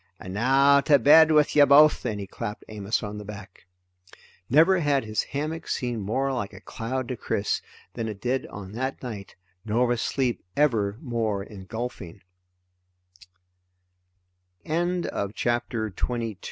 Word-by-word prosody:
And 95 - -8
now, 135 +6 +4
to 145 0 +5
bed 155 +5 +7
with 150 -2 +3
ye 145 - +8
both!" 145 +2 +6
and 105 -3 -3
he 100 - -5
clapped 105 +2 -7
Amos 105 +1 -2
on 105 0 -5
the - - -7
back. 100 -3 -11 0.8
Never 165 +7 +5
had 145 -4 +1
his 110 -1 -1
hammock 155 +3 -4
seemed 120 -3 -2
more 135 +7 -1
like 115 -6 -4
a - - -10
cloud 125 +2 -4
to 125 - -2
Chris 105 -3 -2 0.3
than 115 -2 -4
it 105 -3 -6
did 125 +4 -1
on 100 -2 -9
that 130 +5 -4
night, 105 -6 -7 0.3
nor 115 +3 +1
was 120 -1 0
sleep 130 -3 -1
ever 110 -9 +2
more 115 -7 -2
eng 95 -3 -11
120 Hz, 135 wpm, -25 LUFS, 105-140 Hz, 0.8 s, ye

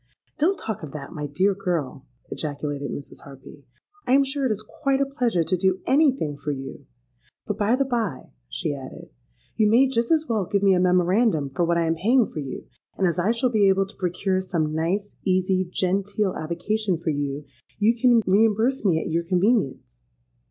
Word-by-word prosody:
'—'Don't 365 +6 +2
talk 220 -3 -5
of 155 -4 -8
that, 140 -2 -7
my 150 -3 -4
dear 185 +8 +1
girl,' 160 -8 -3 0.2
ejaculated 145 -1 -4
Mrs. 140 - -8
Harpy. 140 +1 -14 0.4
'I'm 270 +3 +5
sure 275 0 -2
it - - -1
is 215 0 -4
quite 275 -1 -1
a 275 - +2
pleasure 245 - 0
to 175 +3 0
do 190 +1 +1
any 285 +2 +4
thing 150 - -4
for 150 - -6
you. 135 -2 -6 0.6
But, - - -4
by 210 +4 +3
the 275 +1 +1
by,' 230 - -3 0.2
she 145 - -2
added, 135 -2 -10 0.5
'you 215 -1 +4
may 245 +5 +5
just 235 -3 -1
as 315 -1 +3
well 215 -6 -1
give 200 -1 0
me 195 -1 +5
a 180 - +2
memorandum 180 - +2
for 175 +5 0
what 170 0 +1
I 170 - +1
am 165 - +1
paying 225 +8 +2
for - - -5
you; 135 -3 -6 0.3
and 190 - +1
as 175 -1 +1
I 180 +5 +1
shall 245 +1 0
be 205 -4 +4
able 195 0 +2
to 195 - -15
procure 185 +1 -1
some 160 -5 -2
nice, 180 +6 -2
easy, 185 -1 +1
genteel 195 +2 0
avocation 180 +4 -2
for 165 0 -2
you, 145 0 -3 0.3
you 215 +3 +3
can 235 -1 +4
reimburse 220 +6 +2
me 175 -6 +3
at 160 - -4
your 165 +1 +1
convenience.' 180 - 0
190 Hz, 195 wpm, -24 LUFS, 160-225 Hz, 0.6 s, I'm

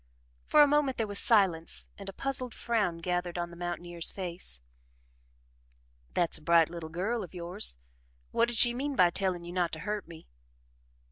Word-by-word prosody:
For 300 - +7
a - - +5
moment 285 -2 +2
there 225 - 0
was 205 -1 -1
silence 190 -8 +2
and 195 -1 -7
a - - -8
puzzled 255 -2 -2
frown 215 -8 0
gathered 175 0 -2
on 175 0 -3
the - - -10
mountaineer's 175 -1 -1
face. 175 - -2 1.6
"That's 170 -2 +1
a - - -21
bright 165 0 +4
little 170 -2 -6
girl 200 +7 -2
of 185 - -11
yours 175 - -2 0.6
What 235 - +3
did 240 -1 -2
she 240 +2 +6
mean 275 +3 -2
by 180 -7 +5
telling 185 -2 -1
you 175 0 -8
not 180 -2 0
to 160 - -4
hurt 210 0 -3
me?" 165 -1 -12
180 Hz, 180 wpm, -30 LUFS, 170-225 Hz, 1.6 s, For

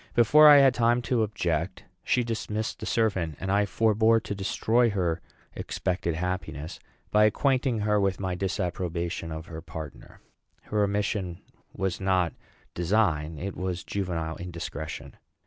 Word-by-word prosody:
Before 150 +7 +7
I 145 -1 +10
had 135 -2 +6
time 120 0 +2
to 125 -2 +1
object, 90 -4 -2 0.2
she 125 - +2
dismissed 110 -1 -3
the - - -6
servant; 95 - 0
and 95 - -2
I 100 +1 +2
forbore 110 +1 +3
to - - -4
destroy 110 +4 +1
her 90 -5 -1 0.3
expected 90 -3 -2
happiness 80 -3 -4 0.3
by 105 0 +5
acquainting 125 +1 +1
her 105 0 +2
with 95 -2 0
my 95 -2 -2
disapprobation 90 -3 -3
of 80 0 -6
her 80 -1 -8
partner. 80 -3 -9 0.4
Her 105 -1 0
omission 100 -3 -1 0.3
was 95 -1 -3
not 95 -3 +1 0.4
design; 85 -4 +1
it 95 +5 -5
was 90 -1 -3
juvenile 85 -5 -3
indiscretion. 85 -3 -7
95 Hz, 140 wpm, -27 LUFS, 85-110 Hz, 0.4 s, I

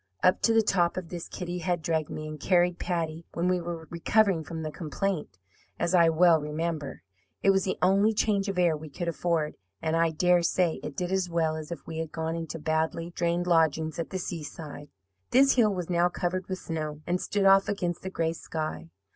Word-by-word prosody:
Up 185 +1 +4
to 230 - +3
the 225 0 +4
top 175 -4 +1
of 180 -3 -5
this 175 -2 -6
Kitty 180 -1 -5
had 175 -1 -1
dragged 160 -1 0
me, 155 0 -5
and 155 0 -7
carried 175 +1 +2
Patty, 165 -2 -2
when 170 +1 0
we 180 -1 +1
were 170 -1 -5
recovering 180 0 +2
from 160 +1 -6
the 155 - -3
complaint, 160 - -3 0.4
as 170 - -1
I 170 -2 +6
well 165 0 +5
remember. 155 - -4 0.4
It 195 - +6
was 195 -1 +2
the 185 - -1
only 195 +4 +4
'change 205 -2 +1
of 195 - -3
air' 175 -3 +3
we 155 0 -8
could 170 +4 -5
afford, 160 0 -1 0.2
and 160 +5 -1
I 165 0 +3
dare 175 +2 +3
say 170 0 +1
it 150 - -7
did 180 0 -2
as 190 -2 0
well 165 -2 +1
as 155 +1 -7
if 165 -5 -6
we 160 -1 -5
had 160 -1 -4
gone 160 0 -3
into 165 -1 -5
badly 160 +2 -1
drained 170 0 0
lodgings 160 -1 +2
at 165 - -3
the 190 - -3
seaside. 155 -4 -7 0.4
"This 270 +2 +5
hill 225 -4 +4
was 180 -3 -3
now 175 0 +2
covered 180 +1 -2
with 185 - -3
snow 155 -3 -5
and 180 +1 0
stood 205 -1 0
off 195 0 +6
against 180 -4 -2
the 190 - -5
gray 165 -3 -1
sky. 155 - -5
170 Hz, 215 wpm, -28 LUFS, 160-180 Hz, 0.4 s, I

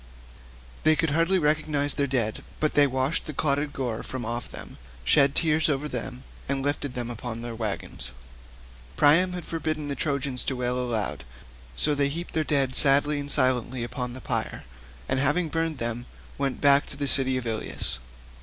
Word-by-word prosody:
They 155 0 +5
could 160 -1 0
hardly 165 +5 +2
recognise 150 -2 +1
their 140 - 0
dead, 120 -5 -1 0.2
but 155 - +1
they 145 -1 +5
washed 130 +6 0
the 155 - -5
clotted 145 0 0
gore 125 -5 -3
from 130 -2 -5
off 120 +1 -4
them, - - -10 0.2
shed 140 - +4
tears 160 -1 +2
over 145 0 -1
them, 125 -1 -6 0.3
and 135 -1 -1
lifted 145 -2 -2
them 120 -1 -4
upon 115 0 -6
their 120 -1 -5
waggons. 105 - -3 0.9
Priam 170 +5 +5
had 180 -1 -6
forbidden 155 -2 -3
the 140 - -2
Trojans 140 -2 0
to 135 - -1
wail 125 0 -1
aloud, 110 - -2 0.5
so 150 - +3
they 140 -1 +1
heaped 170 +5 -5
their 160 - +1
dead 140 -4 +1
sadly 145 +2 +5
and 145 0 -5
silently 130 -3 +1
upon 125 0 -4
the 130 - -9
pyre, - - -3 0.4
and 130 - 0
having 150 +5 +2
burned 165 -1 -1
them 120 0 -3 0.3
went 135 -1 -2
back 140 0 +5
to 140 - -6
the 145 - -2
city 130 -1 +5
of 125 - -4
Ilius. 110 - -3
140 Hz, 180 wpm, -26 LUFS, 125-150 Hz, 0.9 s, They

